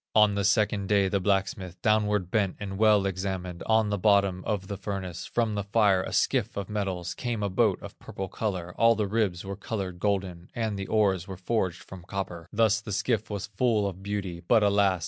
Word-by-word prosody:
On 105 Hz, -1 st, +6 dB
the 100 Hz, 0 st, -1 dB
second 105 Hz, -1 st, +2 dB
day, 100 Hz, -2 st, +4 dB
the 100 Hz, -, +1 dB
blacksmith 95 Hz, -2 st, -1 dB
Downward 105 Hz, -4 st, +2 dB
bent 100 Hz, -4 st, +1 dB
and 95 Hz, -1 st, -5 dB
well 105 Hz, -2 st, +5 dB
examined, 95 Hz, -2 st, -3 dB
On 110 Hz, -1 st, +3 dB
the 105 Hz, -, -1 dB
bottom 100 Hz, -2 st, +3 dB
of 100 Hz, -3 st, -1 dB
the 100 Hz, +1 st, -5 dB
furnace; 95 Hz, -3 st, -5 dB
From 115 Hz, -2 st, 0 dB
the 100 Hz, -1 st, -2 dB
fire, 100 Hz, -2 st, +3 dB
a -, -, -5 dB
skiff -, -, +1 dB
of 100 Hz, -2 st, -4 dB
metals, 95 Hz, -4 st, -2 dB
Came 120 Hz, -4 st, -3 dB
a 100 Hz, -, -1 dB
boat 105 Hz, -1 st, +3 dB
of -, -, -10 dB
purple 95 Hz, -, -6 dB
color, 90 Hz, -4 st, -3 dB
All 115 Hz, 0 st, +6 dB
the 105 Hz, -1 st, 0 dB
ribs 100 Hz, -4 st, -1 dB
were 100 Hz, 0 st, -4 dB
colored 95 Hz, -3 st, -5 dB
golden, 95 Hz, -3 st, -2 dB
And 110 Hz, -3 st, -1 dB
the 100 Hz, -1 st, -5 dB
oars 95 Hz, -5 st, +2 dB
were 95 Hz, -2 st, -7 dB
forged 95 Hz, -2 st, -1 dB
from 95 Hz, -2 st, -10 dB
copper; 90 Hz, -4 st, -5 dB
Thus 110 Hz, 0 st, +3 dB
the 110 Hz, -, -7 dB
skiff 110 Hz, +1 st, 0 dB
was 100 Hz, -2 st, -3 dB
full 105 Hz, +1 st, +1 dB
of 95 Hz, -1 st, -4 dB
beauty, 100 Hz, -4 st, -4 dB
But 115 Hz, -3 st, +5 dB
alas! 100 Hz, -2 st, +3 dB
100 Hz, 205 wpm, -27 LUFS, 95-105 Hz, -, On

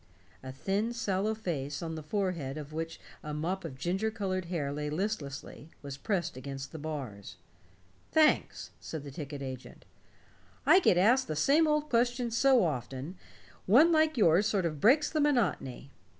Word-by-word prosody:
A 130 Hz, -, -7 dB
thin 200 Hz, -, -1 dB
sallow 215 Hz, -2 st, -1 dB
face, 150 Hz, -9 st, -4 dB
on 165 Hz, -1 st, -4 dB
the 160 Hz, -, -5 dB
forehead 165 Hz, -5 st, -2 dB
of 150 Hz, 0 st, -8 dB
which 165 Hz, +1 st, -4 dB, 0.2 s
a 150 Hz, -1 st, -5 dB
mop 180 Hz, +5 st, -2 dB
of 145 Hz, -6 st, -7 dB
ginger 185 Hz, +9 st, -1 dB
colored 190 Hz, -5 st, -3 dB
hair 165 Hz, -5 st, -2 dB
lay 150 Hz, 0 st, -3 dB
listlessly, 155 Hz, -4 st, -4 dB
was 140 Hz, -1 st, -6 dB
pressed 175 Hz, -, -2 dB
against 135 Hz, +1 st, -7 dB
the 160 Hz, -, -8 dB
bars. 135 Hz, -10 st, -6 dB, 0.8 s
"Thanks," 310 Hz, -1 st, +2 dB
said 160 Hz, -3 st, -6 dB
the 140 Hz, -, -8 dB
ticket 140 Hz, -1 st, -6 dB
agent. 130 Hz, -1 st, -8 dB, 0.8 s
"I 370 Hz, -, +7 dB
get 265 Hz, -, +3 dB
asked 240 Hz, +8 st, +4 dB
the 155 Hz, -, -3 dB
same 290 Hz, -, +4 dB
old 300 Hz, 0 st, +1 dB
questions 240 Hz, -1 st, +1 dB
so 260 Hz, -1 st, +5 dB
often, 135 Hz, +2 st, -4 dB, 0.5 s
one 280 Hz, -, +6 dB
like 315 Hz, -2 st, +3 dB
yours 190 Hz, 0 st, +4 dB
sort 200 Hz, -5 st, 0 dB
of 155 Hz, -4 st, -3 dB
breaks 280 Hz, +7 st, +5 dB
the 310 Hz, -, -1 dB
monotony. 195 Hz, -, 0 dB
175 Hz, 165 wpm, -30 LUFS, 145-225 Hz, 0.8 s, I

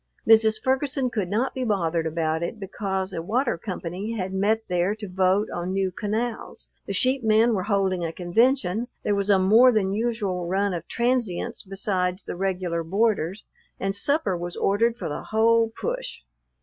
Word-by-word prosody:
Mrs. 220 Hz, -1 st, +5 dB
Ferguson 265 Hz, 0 st, 0 dB
could 200 Hz, -6 st, -2 dB
not 230 Hz, +7 st, 0 dB
be 260 Hz, -, -3 dB
bothered 170 Hz, -7 st, 0 dB
about 160 Hz, 0 st, -1 dB
it, 170 Hz, +6 st, -4 dB
because 190 Hz, -1 st, -3 dB
a 165 Hz, -, -3 dB
water 235 Hz, +7 st, 0 dB
company 185 Hz, +3 st, -5 dB
had 190 Hz, -1 st, -3 dB
met 210 Hz, +3 st, +1 dB
there 180 Hz, +3 st, 0 dB
to 215 Hz, -1 st, -7 dB
vote 190 Hz, +3 st, +2 dB
on 175 Hz, +2 st, -3 dB
new 190 Hz, -1 st, 0 dB
canals, 220 Hz, +5 st, -4 dB, 0.2 s
the -, -, -3 dB
sheep 255 Hz, +6 st, +2 dB
men 220 Hz, +2 st, +4 dB
were 185 Hz, -3 st, -1 dB
holding 190 Hz, -3 st, +1 dB
a 165 Hz, -, -2 dB
convention, 220 Hz, +4 st, +1 dB, 0.2 s
there 205 Hz, -, +1 dB
was 200 Hz, 0 st, 0 dB
a 200 Hz, -, +6 dB
more 220 Hz, +7 st, +6 dB
than 195 Hz, -4 st, +1 dB
usual 205 Hz, -6 st, -1 dB
run 195 Hz, +2 st, 0 dB
of 170 Hz, -1 st, -5 dB
transients 235 Hz, -3 st, -1 dB
besides 190 Hz, -1 st, -2 dB
the -, -, -5 dB
regular 180 Hz, -2 st, -1 dB
boarders, 195 Hz, 0 st, 0 dB, 0.3 s
and 195 Hz, 0 st, -1 dB
supper 245 Hz, -, 0 dB
was 175 Hz, 0 st, -5 dB
ordered 230 Hz, +4 st, +1 dB
for -, -, -4 dB
the 145 Hz, -, -4 dB
whole 225 Hz, +1 st, +3 dB
push. -, -, -4 dB
200 Hz, 175 wpm, -25 LUFS, 180-225 Hz, 0.3 s, a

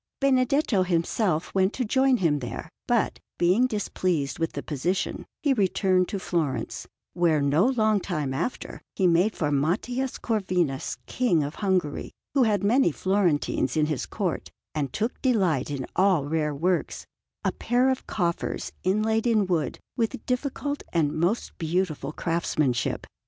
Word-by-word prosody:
Benedetto 265 Hz, -4 st, +3 dB
himself 175 Hz, 0 st, 0 dB
went 190 Hz, +1 st, +2 dB
to 255 Hz, -, -1 dB
join 265 Hz, +3 st, +3 dB
him 160 Hz, -7 st, +2 dB
there; 120 Hz, -3 st, -6 dB, 0.2 s
but, -, -, +1 dB, 0.2 s
being 185 Hz, +9 st, +4 dB
displeased 180 Hz, -, -1 dB
with 165 Hz, 0 st, -1 dB
the -, -, -5 dB
position, 165 Hz, +6 st, -2 dB, 0.2 s
he 285 Hz, -3 st, +4 dB
returned 190 Hz, -4 st, +2 dB
to 200 Hz, -, -3 dB
Florence, 165 Hz, -7 st, -2 dB, 0.3 s
where, 170 Hz, -3 st, +3 dB
no 145 Hz, -, +3 dB
long 220 Hz, -5 st, +2 dB
time 155 Hz, -8 st, -2 dB
after, 170 Hz, -, -4 dB
he 190 Hz, -, +1 dB
made 180 Hz, +5 st, +3 dB
for 150 Hz, -3 st, -1 dB
Matthias 220 Hz, -, 0 dB
Corvinus, 180 Hz, -, -1 dB
King 200 Hz, -, +1 dB
of 145 Hz, +2 st, -4 dB
Hungary, 185 Hz, -7 st, 0 dB, 0.2 s
who 275 Hz, -, +3 dB
had 210 Hz, -4 st, +2 dB
many 225 Hz, -1 st, +4 dB
Florentines 170 Hz, -7 st, +1 dB
in 155 Hz, -, +4 dB
his 150 Hz, -4 st, -2 dB
Court -, -, -3 dB, 0.2 s
and 145 Hz, -4 st, -2 dB
took 225 Hz, -, -2 dB
delight 185 Hz, -, +2 dB
in 140 Hz, -3 st, -3 dB
all 185 Hz, -6 st, +3 dB
rare 150 Hz, -1 st, -1 dB
works, 175 Hz, +4 st, -1 dB, 0.4 s
a -, -, +1 dB
pair 250 Hz, +2 st, +2 dB
of 260 Hz, -, -4 dB
coffers 170 Hz, -4 st, -2 dB
inlaid 220 Hz, +4 st, +1 dB
in 220 Hz, -4 st, +3 dB
wood 165 Hz, -7 st, -1 dB, 0.2 s
with 225 Hz, -2 st, -1 dB
difficult 280 Hz, +3 st, -2 dB
and 155 Hz, -4 st, +1 dB
most 175 Hz, +8 st, -1 dB
beautiful 160 Hz, -4 st, -1 dB
craftsmanship. 155 Hz, -6 st, -1 dB
185 Hz, 145 wpm, -26 LUFS, 155-220 Hz, 0.4 s, being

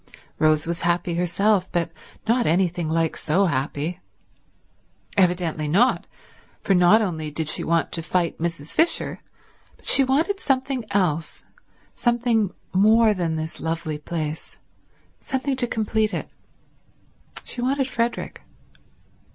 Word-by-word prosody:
Rose 155 Hz, -1 st, +3 dB
was 170 Hz, 0 st, -2 dB
happy 175 Hz, 0 st, 0 dB
herself, 185 Hz, +3 st, +1 dB
but 170 Hz, -1 st, 0 dB, 0.4 s
not 235 Hz, +1 st, +2 dB
anything 175 Hz, -1 st, +1 dB
like 165 Hz, 0 st, +1 dB
so 180 Hz, +6 st, +1 dB
happy. 145 Hz, +3 st, -2 dB, 1.2 s
Evidently 175 Hz, -5 st, +1 dB
not, 205 Hz, +12 st, +2 dB, 0.6 s
for 195 Hz, -, +2 dB
not 180 Hz, +5 st, +5 dB
only 160 Hz, -6 st, -3 dB
did 155 Hz, +1 st, -3 dB
she -, -, +2 dB
want 165 Hz, 0 st, +1 dB
to 165 Hz, -, -1 dB
fight 175 Hz, 0 st, -1 dB
Mrs. 165 Hz, -2 st, -4 dB
Fisher 330 Hz, +1 st, +1 dB, 0.6 s
but -, -, -21 dB
she 275 Hz, -, +5 dB
wanted 315 Hz, +10 st, +1 dB
something 265 Hz, -4 st, -1 dB
else, 180 Hz, -6 st, -1 dB, 0.5 s
something 235 Hz, -4 st, +1 dB, 0.2 s
more 215 Hz, +3 st, +5 dB
than 170 Hz, -4 st, -1 dB
this 160 Hz, +1 st, -5 dB
lovely 160 Hz, -2 st, -3 dB
place, 155 Hz, -1 st, -5 dB, 0.6 s
something 265 Hz, +1 st, -2 dB
to 250 Hz, -2 st, 0 dB
complete 220 Hz, -1 st, 0 dB
it; -, -, -5 dB, 1.1 s
she 245 Hz, -, -5 dB
wanted 270 Hz, +1 st, +1 dB
Frederick. 235 Hz, -2 st, -2 dB
180 Hz, 125 wpm, -23 LUFS, 165-230 Hz, 1.2 s, not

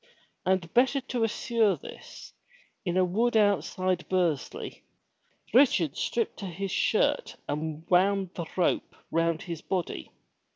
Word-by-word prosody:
And 185 Hz, -3 st, +1 dB
better 260 Hz, +3 st, +4 dB
to 250 Hz, -3 st, -2 dB
assure 225 Hz, -1 st, +2 dB
this, -, -, -11 dB, 0.5 s
in 180 Hz, -2 st, -1 dB
a 185 Hz, -, +4 dB
wood 225 Hz, +6 st, +1 dB
outside 185 Hz, -2 st, +1 dB
Bursley, 175 Hz, -7 st, -1 dB, 0.7 s
Richard 220 Hz, -, +4 dB
stripped 230 Hz, -1 st, -1 dB
to 195 Hz, -, -5 dB
his 190 Hz, +2 st, -4 dB
shirt -, -, +1 dB
and 155 Hz, +2 st, -4 dB
wound 190 Hz, +1 st, +3 dB
the 170 Hz, -2 st, -5 dB
rope 180 Hz, -, 0 dB, 0.2 s
round 165 Hz, 0 st, +1 dB
his 170 Hz, -3 st, -6 dB
body. 175 Hz, -, -3 dB
185 Hz, 125 wpm, -28 LUFS, 170-215 Hz, 0.7 s, better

